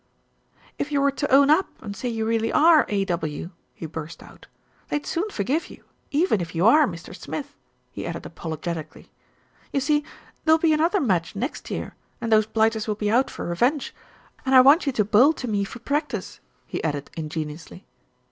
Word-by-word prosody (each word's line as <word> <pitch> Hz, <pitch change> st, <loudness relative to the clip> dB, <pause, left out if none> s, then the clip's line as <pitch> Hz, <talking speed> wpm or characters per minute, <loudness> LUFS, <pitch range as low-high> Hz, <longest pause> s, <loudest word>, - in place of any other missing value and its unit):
"If 290 Hz, -, -2 dB
you 285 Hz, -, +2 dB
were 280 Hz, 0 st, +3 dB
to 285 Hz, +1 st, -3 dB
own 280 Hz, +2 st, +6 dB
up 345 Hz, +5 st, +4 dB
and 200 Hz, -2 st, -7 dB
say 245 Hz, +5 st, -3 dB
you 225 Hz, -1 st, -2 dB
really 225 Hz, 0 st, 0 dB
are 320 Hz, 0 st, +5 dB
A.W.," 175 Hz, -5 st, -2 dB, 0.2 s
he -, -, -7 dB
burst 160 Hz, +1 st, -7 dB
out, -, -, -16 dB, 0.4 s
"they'd 295 Hz, 0 st, -2 dB
soon 370 Hz, +6 st, -2 dB
forgive 275 Hz, -, -1 dB
you -, -, -14 dB, 0.3 s
even 295 Hz, -, +2 dB
if 170 Hz, 0 st, -6 dB
you 170 Hz, +4 st, +2 dB
are 295 Hz, +6 st, +6 dB
Mr. 170 Hz, -1 st, -8 dB
Smith?" 285 Hz, +6 st, -7 dB, 0.4 s
he -, -, -6 dB
added -, -, -6 dB
apologetically. 160 Hz, -1 st, -6 dB, 0.6 s
"You 275 Hz, -, +1 dB
see, 295 Hz, +2 st, +1 dB, 0.4 s
there'll 320 Hz, 0 st, +5 dB
be 320 Hz, -1 st, +3 dB
another 330 Hz, +6 st, +2 dB
match 190 Hz, -, 0 dB
next 250 Hz, +9 st, -4 dB
year, -, -, -4 dB, 0.3 s
and 230 Hz, -, -3 dB
those 215 Hz, -1 st, +4 dB
blighters 220 Hz, 0 st, +1 dB
will 210 Hz, -, 0 dB
be 210 Hz, 0 st, -1 dB
out 250 Hz, +4 st, +3 dB
for -, -, -6 dB
revenge, 245 Hz, -, 0 dB, 0.5 s
and 265 Hz, 0 st, +2 dB
I 255 Hz, -, +10 dB
want 285 Hz, +5 st, +5 dB
you -, -, +3 dB
to 210 Hz, -4 st, +1 dB
bowl 240 Hz, +9 st, +5 dB
to 255 Hz, -, -6 dB
me 205 Hz, -3 st, 0 dB
for 200 Hz, -, -7 dB
practice," 290 Hz, +5 st, -3 dB, 0.3 s
he -, -, -5 dB
added 145 Hz, -3 st, -3 dB
ingenuously. 160 Hz, +3 st, -6 dB
225 Hz, 185 wpm, -24 LUFS, 180-290 Hz, 0.6 s, I